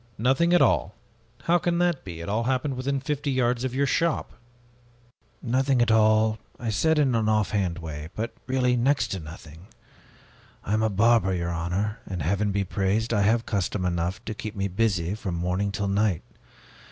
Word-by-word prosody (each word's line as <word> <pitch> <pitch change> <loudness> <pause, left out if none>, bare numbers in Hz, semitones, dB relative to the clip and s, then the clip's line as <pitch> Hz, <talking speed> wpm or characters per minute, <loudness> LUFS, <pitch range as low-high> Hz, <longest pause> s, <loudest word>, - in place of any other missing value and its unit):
"Nothing 135 +9 +2
at 175 - +6
all? 95 - +1 0.5
How 175 +1 +3
can 170 0 0
that 175 -4 +1
be? 85 -3 -7
It 85 - -7
all 110 +3 0
happened 130 +2 0
within 135 +2 -1
fifty 145 +1 -3
yards 125 -2 +1
of 130 -1 -2
your 140 +1 +2
shop." 165 +4 0 1.1
"'Nothing 130 +2 +1
at 120 -1 +3
all,' 110 0 +3 0.2
I 115 -2 -2
said,... 160 +11 +2
in 140 -4 +3
an 110 -2 +1
off 110 -2 +1
hand 95 -5 0
way; 80 -2 -7
but 115 +2 -3
really, 130 -1 +2
next 135 +4 +1
to 95 - -3
nothing. 80 +2 -11 1.0
I 100 - -2
am 110 - +2
a 110 - +2
barber, 105 -1 +3
your 85 -1 -2
honor, 90 +6 -2
and 90 -5 -4
Heaven 100 +6 0
be 100 0 0
praised! 100 +4 -1
I 105 - +2
have 115 +3 +2
custom 100 -2 -1
enough 85 +1 -2
to 110 - -3
keep 110 0 -7
me 100 0 -1
busy 95 -3 0
from 100 -4 -4
morning 90 +4 -1
till 100 0 -2
night. 100 -3 +1
110 Hz, 190 wpm, -25 LUFS, 95-125 Hz, 1.1 s, at